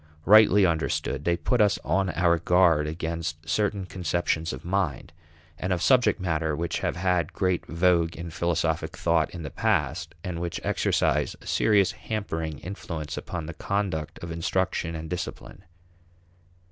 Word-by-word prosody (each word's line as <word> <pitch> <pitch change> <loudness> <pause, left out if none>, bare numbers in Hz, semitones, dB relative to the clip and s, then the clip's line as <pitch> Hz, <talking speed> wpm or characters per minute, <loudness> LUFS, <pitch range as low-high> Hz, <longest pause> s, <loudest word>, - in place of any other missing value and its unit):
Rightly 105 -2 +7
understood, 75 -3 -1
they 85 0 +2
put 125 +4 +1
us 105 -2 +4
on 95 -1 +1
our 85 -2 +2
guard 85 -3 +3
against 80 0 -4
certain 100 +2 0
conceptions 85 -2 -1
of 65 - -8
mind 90 -8 -1 0.5
and 90 - -2
of 90 - +1
subject 125 -4 +4
matter 80 -4 -1
which 85 +2 -2
have - - -1
had 90 -2 0
great 90 -3 0
vogue 85 -1 +2
in 85 0 -7
philosophic 80 -1 -1
thought - - +2
in 85 -2 -8
the 70 - -6
past, 80 +1 -1
and 85 -2 -4
which 85 -1 -3
exercise - - +1
a - - -17
serious 100 -4 +3
hampering 80 -8 -4
influence 80 -5 -6
upon 85 -3 -5
the 85 - -6
conduct 95 -4 -2
of 85 - -5
instruction 85 0 -1
and 80 0 -6
discipline. 80 -7 -6
85 Hz, 150 wpm, -26 LUFS, 80-95 Hz, 0.5 s, Rightly